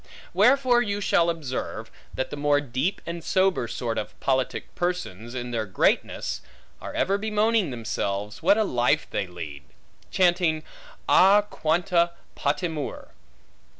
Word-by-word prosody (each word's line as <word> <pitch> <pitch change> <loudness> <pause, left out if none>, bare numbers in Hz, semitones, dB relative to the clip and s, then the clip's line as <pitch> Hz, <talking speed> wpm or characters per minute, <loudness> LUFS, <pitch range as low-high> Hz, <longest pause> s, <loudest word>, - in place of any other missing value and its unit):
Wherefore 255 -2 +4
you 205 -3 -1
shall 170 -3 +3
observe, 155 -6 -4 0.2
that 130 - -3
the - - -3
more 145 0 +2
deep 145 +8 -2
and 170 -1 -5
sober 185 -10 +2
sort 115 0 -2
of 105 - -7
politic 130 -1 -1
persons, 130 - -3
in 120 -1 -4
their 110 -3 -2
greatness, 95 - 0 0.4
are - - -7
ever 200 +1 +1
bemoaning 215 -2 +1
themselves, 105 -4 -3
what 195 +5 +4
a 220 - +3
life 125 - +1
they 100 - -1
lead; 80 -5 -8 0.5
chanting 175 -4 +2 0.4
a 200 +2 +6
quanta 170 +1 +1 0.2
patimur! 150 0 -2
160 Hz, 130 wpm, -25 LUFS, 120-190 Hz, 0.5 s, a